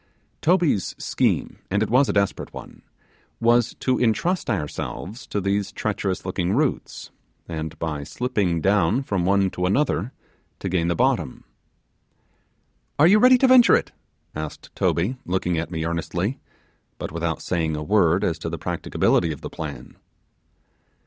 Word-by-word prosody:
Toby's 170 - +2
scheme, - - -1
and 100 +3 +1
it - - -3
was 130 +3 +4
a - - +1
desperate 100 -1 0
one, - - -11 0.6
was 120 0 +3
to 130 -1 +1
entrust 145 +9 +1
ourselves 100 - -4
to 105 - -2
these 100 +1 -1
treacherous 100 -4 -2
looking 90 0 -1
roots, 140 +3 -2 0.4
and 80 -1 -5
by 75 -3 -3
slipping 100 - -1
down 100 - +2
from 95 -8 -1
one 95 0 +2
to 90 0 -1
another 120 - 0 0.5
to 95 - -4
gain 85 -2 0
the 85 - +1
bottom. - - 0 1.5
'Are 145 - +6
you 200 +5 +6
ready 255 +2 +7
to 265 - +4
venture 255 -2 +7
it?' - - -1 0.4
asked 75 0 -7
Toby, 100 +10 0
looking 90 -2 -1
at 80 - -4
me 80 -2 -3
earnestly 85 +7 -2 0.6
but - - -5
without 85 0 -3
saying 80 -3 -1
a 75 - -4
word 90 -1 +3
as 80 -2 0
to 80 - -4
the 85 - -4
practicability 80 +2 0
of 75 - -7
the - - -7
plan. 70 -6 -7
95 Hz, 150 wpm, -23 LUFS, 85-120 Hz, 1.5 s, ready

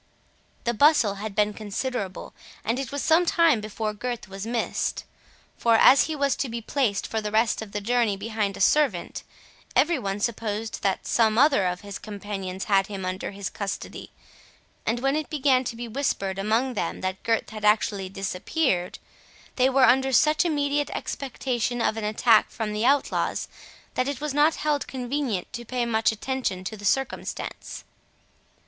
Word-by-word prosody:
The 235 - 0
bustle 280 -4 +4
had 215 -2 -5
been 210 0 +2
considerable, 210 -1 -4 0.3
and 230 +4 0
it 270 -3 -4
was 285 0 -3
some 325 +2 +4
time 330 -8 +3
before 215 0 -3
Gurth 240 +1 -5
was 195 +2 -7
missed; 235 0 -1 0.6
for, 230 -1 +4
as 265 +4 +7
he 315 - -3
was 280 -2 +1
to 270 - -2
be 235 +1 -4
placed 230 -3 0
for 220 - -2
the 210 - -3
rest 225 +1 +2
of 220 -2 -8
the 205 0 -3
journey 230 -2 +1
behind 210 -1 -2
a - - -6
servant, 300 +7 +2 0.5
every 330 -2 +3
one 195 -3 -3
supposed 220 0 -3
that 195 -1 0
some 220 -2 +2
other 265 -8 +4
of 180 0 -3
his 200 -1 -7
companions 200 -3 -5
had 195 -1 +2
him 195 -3 -5
under 185 +1 -3
his 200 -1 -5
custody, 200 -1 -5 0.8
and 235 +2 0
when 270 +2 +1
it 310 -1 -2
began 270 -4 +2
to 240 -1 -4
be 240 +1 -6
whispered 215 -6 -2
among 225 +6 +1
them 170 - -3
that 185 0 -3
Gurth 230 -1 0
had 215 -1 -8
actually 210 -2 +2
disappeared, 195 - -1 0.6
they 255 0 +4
were 265 0 +5
under 265 +2 +4
such 305 +6 +4
immediate 290 -2 0
expectation 250 -2 -2
of 225 - +1
an 220 -1 -3
attack 215 +1 +4
from 220 -2 -4
the 215 +3 +1
outlaws, 280 +1 +1 0.5
that 255 - 0
it 280 -3 -3
was 300 -2 -3
not 300 +3 +4
held 300 -2 -1
convenient 255 -6 -3
to 240 -2 -5
pay 245 +1 -2
much 225 -1 +2
attention 220 -4 -3
to 205 +4 -5
the 205 -1 -9
circumstance. 270 +7 -2
230 Hz, 175 wpm, -25 LUFS, 205-265 Hz, 0.8 s, as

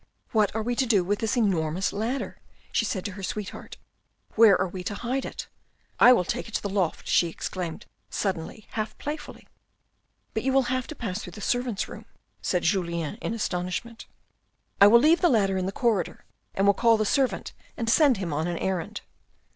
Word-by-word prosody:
What 215 -2 +2
are 220 - -1
we 240 +2 -1
to 265 - +2
do 205 -6 +4
with 205 +3 -1
this 225 +3 -1
enormous 185 -5 +1
ladder? 230 +6 -3 0.2
" - - -32
she - - +1
said 190 -6 -3
to 205 - -2
her 195 +1 -9
sweetheart, 195 +1 -6 0.3
" - - -36
where 220 -4 +7
are 185 - +1
we 180 0 -7
to 205 - -3
hide 250 +5 -2
it? - - -6 0.5
I 250 - +9
will 240 -8 +5
take - - -3
it 225 - -7
to - - 0
the 200 - -2
loft," 190 -5 -1
she 175 - +3
exclaimed 175 +2 -5 0.2
suddenly 190 +2 -3
half 215 0 -4
playfully. 295 +1 -7 0.4
" - - -46
But 220 - -1
you 265 +2 0
will 265 -2 +3
have 255 -1 -2
to 310 - -7
pass 210 -5 -4
through - - -9
the - - -9
servants' 245 -2 -1
room," - - -10 0.4
said 180 -2 0
Julien 170 -2 -1
in 230 - -2
astonishment. 200 +3 -3 0.4
" - - -30
I 200 - +11
will 235 +3 +8
leave 315 +6 +4
the 350 - +5
ladder 195 -6 +2
in 185 - -1
the - - -2
corridor 220 -2 -1 0.3
and 195 - +2
will 200 - +6
call 230 +2 +4
the 215 - 0
servant 265 +4 0 0.2
and 230 - -3
send 270 0 +5
him 180 -5 -3
on 155 +3 -1
an 175 -1 -2
errand." 185 -2 -3
210 Hz, 210 wpm, -26 LUFS, 185-235 Hz, 0.5 s, I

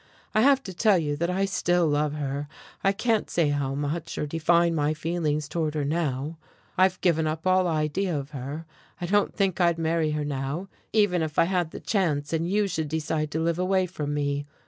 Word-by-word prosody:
I 215 - +4
have 270 +2 +5
to 190 - -7
tell 205 +1 +4
you 150 -3 -1
that 170 +3 0
I 190 +2 +1
still 175 -3 +1
love 150 -1 +1
her 145 -1 -3 0.4
I 195 - +4
can't 220 +2 0
say 165 -4 +2
how 140 -2 -1
much, 150 +3 -3
or - - -1
define 170 +2 +2
my 150 -1 +1
feelings 155 -2 -1
toward 155 0 -2
her 150 -2 0
now. 150 0 -2 0.4
I've 185 0 +3
given 160 -3 +2
up 160 +2 -3
all 185 0 +4
idea 160 +2 0
of 140 +1 -6
her. 140 +3 -6 0.3
I 175 - -3
don't 205 +3 +1
think 195 -3 +1
I'd 170 -1 +3
marry 165 -1 +1
her 150 -1 -1
now, 145 +6 -3 0.2
even 205 -5 +3
if 155 -1 -3
I - - +6
had 175 -1 0
the - - -8
chance, 160 -8 0
and 165 +1 0
you 205 +1 +2
should 160 -4 -2
decide 155 0 -1
to 160 - 0
live 170 +1 0
away 185 0 +2
from 155 -5 -4
me. 145 0 -1
165 Hz, 210 wpm, -26 LUFS, 150-180 Hz, 0.4 s, I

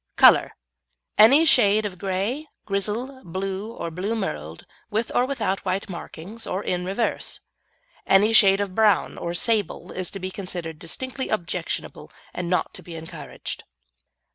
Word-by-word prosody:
COLOUR - - +7 0.7
Any 270 +9 +8
shade 215 -7 +5
of 185 -3 -5
grey, 200 +11 -2 0.2
grizzle, 220 +7 -2
blue 190 +4 -4
or 170 -7 -5
blue 190 +7 -2
merled, 80 - -4 0.2
with 220 +2 -1
or 250 - +3
without 220 -8 -1
white 190 +2 -2
markings, 185 +4 -8
or 190 +3 -2
in 180 0 -1
reverse; 200 +5 -2 0.7
any 205 +3 +5
shade 195 -3 +7
of 200 -2 -3
brown 210 -3 +3
or 170 0 -3
sable 215 +2 0
to 185 +1 -4
be 185 0 -4
considered 175 -5 -5
distinctly 260 - -4
objectionable 180 -4 -3 0.2
and 175 -1 -3
not 180 - 0
to - - -7
be 170 - -9
encouraged. 160 0 -7
195 Hz, 140 wpm, -24 LUFS, 180-220 Hz, 0.7 s, Any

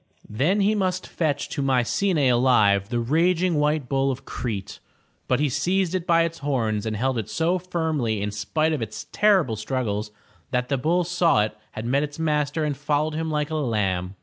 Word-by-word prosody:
Then 155 - +1
he 205 +2 +3
must 185 -3 -1
fetch 145 -4 -1
to 145 - -3
Mycenae 135 +5 +1
alive 115 -6 +3
the 120 -1 -1
raging 165 +6 +2
white 150 -2 +1
bull 135 0 +1
of 135 +1 -4
Crete, 105 -6 -5 0.5
but - - +2
he 150 - +2
seized 180 +6 0
it 180 -2 -2
by 165 -1 +4
its 165 0 -3
horns 115 -7 -1
and 110 - -2
held 130 +1 0
it 110 - -5
so 170 +3 0
firmly 160 - -1
in 105 +1 -2
spite 155 +11 0
of 150 - -2
its 110 -1 -5
terrible 190 - +3
struggles 110 -2 -2 0.4
that 125 -2 -1
the 140 - +1
bull 170 +6 +2
saw 170 -10 +2
it 105 0 -4 0.2
had 110 - -5
met 135 +4 +2
its 145 -1 -4
master 150 -1 0
and 145 -2 -1
followed 150 +2 0
him 160 +1 -2
like 150 0 -1
a - - -1
lamb. 100 -8 -1
145 Hz, 195 wpm, -24 LUFS, 115-165 Hz, 0.5 s, by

